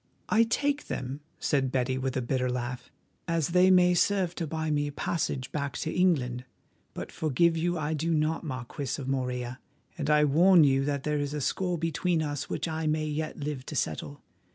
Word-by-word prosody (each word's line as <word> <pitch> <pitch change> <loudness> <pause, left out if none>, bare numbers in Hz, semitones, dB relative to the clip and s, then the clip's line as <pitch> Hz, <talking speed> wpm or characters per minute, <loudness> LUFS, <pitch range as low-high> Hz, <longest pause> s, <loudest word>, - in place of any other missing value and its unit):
"I 225 +2 +5
take 285 +5 0
them," 130 +2 -4 0.2
said 135 -3 +1
Betty, 130 0 0
with 130 -1 -2
a 130 - -1
bitter 125 +1 0
laugh, 125 0 -4 0.4
"as 165 -3 0
they 180 +2 +5
may 180 -1 +6
serve 185 0 +2
to 165 -3 -4
buy 160 0 -2
me 145 -1 +1
a - - -4
passage 140 -4 -2
back 140 -2 -3
to 160 - -2
England. 130 -9 +1 0.5
But - - -6
forgive 165 +2 +2
you 175 +2 0
I 155 0 -1
do 160 +2 -1
not, 155 +1 +1
Marquis 130 -1 -4
of 135 - -5
Morella, 125 -2 -2 0.4
and 145 -1 -1
I 150 0 +5
warn 170 +4 +6
you 135 -1 +3
that 140 -2 -1
there 150 -1 0
is 145 +1 -2
a - - -2
score 180 +5 0
between 165 +1 0
us 145 -2 -3
which - - -2
I 160 -1 -2
may 155 0 +1
yet 155 +1 -3
live 145 -3 -3
to 155 - -6
settle. 75 - -3
150 Hz, 200 wpm, -28 LUFS, 130-165 Hz, 0.5 s, may